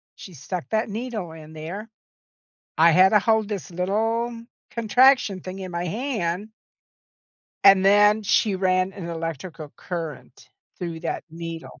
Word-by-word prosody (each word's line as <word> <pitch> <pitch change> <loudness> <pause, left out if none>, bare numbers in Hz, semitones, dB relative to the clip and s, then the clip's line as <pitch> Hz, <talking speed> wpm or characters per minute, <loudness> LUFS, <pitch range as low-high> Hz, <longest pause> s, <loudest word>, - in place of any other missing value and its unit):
she 185 - -11
stuck 165 +5 -6
that 220 0 0
needle 215 -5 -5
in 160 -1 -12
there. 175 +8 -7 0.9
I 165 +1 +7
had 185 +4 +6
to 210 - +5
hold 220 0 +2
this 195 -8 -5
little 225 +6 -1 0.3
contraction 235 -2 +4
thing 185 +2 -8
in 185 -1 -6
my 175 +1 -3
hand 210 - -2 1.2
and 195 -1 +7
then 205 +2 +5
she 210 0 +2
ran 185 0 +1
an 180 -3 -7
electrical 165 -1 -6
current 165 -5 -7 0.3
through 170 -2 -5
that 165 - -4
needle. 165 -3 -8
190 Hz, 135 wpm, -24 LUFS, 170-215 Hz, 1.2 s, I